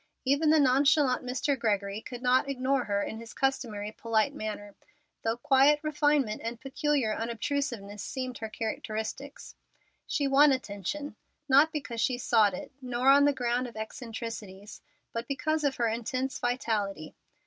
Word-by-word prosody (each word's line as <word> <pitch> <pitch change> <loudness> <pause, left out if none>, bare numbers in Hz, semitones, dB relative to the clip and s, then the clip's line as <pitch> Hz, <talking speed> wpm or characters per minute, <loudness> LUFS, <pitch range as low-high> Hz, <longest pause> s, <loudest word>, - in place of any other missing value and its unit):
Even 285 +4 +3
the 315 0 +5
nonchalant 275 0 +4
Mr. 255 +3 0
Gregory 205 -2 -1
could 245 +1 -8
not 255 +2 +3
ignore 265 -1 0
her 200 -1 0
in 220 - -5
his 230 0 -11
customary 225 -6 -1
polite 220 -1 0
manner, 205 -1 -6 0.5
though 225 +1 -1
quiet 280 +2 +4
refinement 295 -6 +1
and 230 +1 -4
peculiar 270 -3 0
unobtrusiveness 230 -3 -3
seemed 255 +1 -5
her 220 - -5
characteristics. 220 +5 -5 0.5
She 285 -3 0
won 280 +2 +6
attention, 255 - -4 0.3
not 285 +4 +6
because 265 -7 -4
she 250 -2 +1
sought 220 -5 +3
it, - - -8
nor 250 +1 +1
on 285 +1 +6
the 290 - +5
ground 250 -1 -1
of 235 - -12
eccentricities, 220 -4 -7 0.3
but 230 +1 -4
because 310 +2 -1
of 280 -2 +1
her 235 - +1
intense 255 +4 -2
vitality. 210 -9 -2
250 Hz, 150 wpm, -29 LUFS, 220-275 Hz, 0.5 s, won